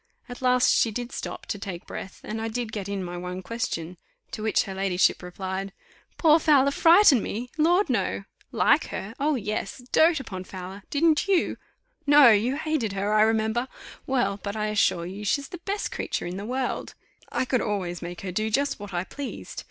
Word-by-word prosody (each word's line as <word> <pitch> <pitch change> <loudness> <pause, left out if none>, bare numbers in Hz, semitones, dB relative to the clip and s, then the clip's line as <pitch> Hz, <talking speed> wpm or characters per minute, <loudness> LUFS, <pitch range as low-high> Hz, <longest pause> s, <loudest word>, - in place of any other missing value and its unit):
At 245 0 -9
last 250 -1 +4
she 230 - +3
did 245 +3 -5
stop - - -6
to 205 - -4
take 185 -3 -6
breath, 190 - -8
and 220 +1 -4
I 225 - -2
did 230 0 -3
get 200 -3 -5
in 200 -2 -2
my 175 0 -5
one 180 +1 -5
question: 180 -7 -4 0.3
to - - -6
which 220 0 +2
her 195 - -6
ladyship 190 -1 +2
replied, 190 +2 -5 0.4
"Poor 320 -1 +5
Fowler 280 -3 +4
frighten 330 - +6
me? 240 +6 -5
Lord! 345 +6 +3
No. 200 -6 -1 0.3
Like - - +3
her? 205 +3 -6
oh! 295 +2 +2
yes 210 -3 -3
dote 320 -1 +5
upon 190 -8 -6
Fowler! 190 +2 -8
didn't 315 +3 +2
you? 380 -4 +2 0.5
No, 290 -3 +8
you 225 +5 +2
hated 305 -10 -1
her, 200 +2 -1
I 215 - +5
remember. 220 +2 +2 0.4
Well, 245 -7 0
but 200 0 -4
I 215 0 -1
assure 200 -5 +2
you 195 +4 -7
she's 275 +7 0
the 355 - -8
best 405 +1 -2
creature - - -3
in 175 +2 -4
the 200 - -5
world; 255 +1 -3 0.4
I - - 0
could 255 -1 +1
always 185 -5 -2
make 175 0 -7
her 190 - -4
do 215 +4 -1
just 280 +5 0
what 200 -2 -7
I 175 - 0
pleased. 275 +8 -7
220 Hz, 195 wpm, -26 LUFS, 195-270 Hz, 0.5 s, No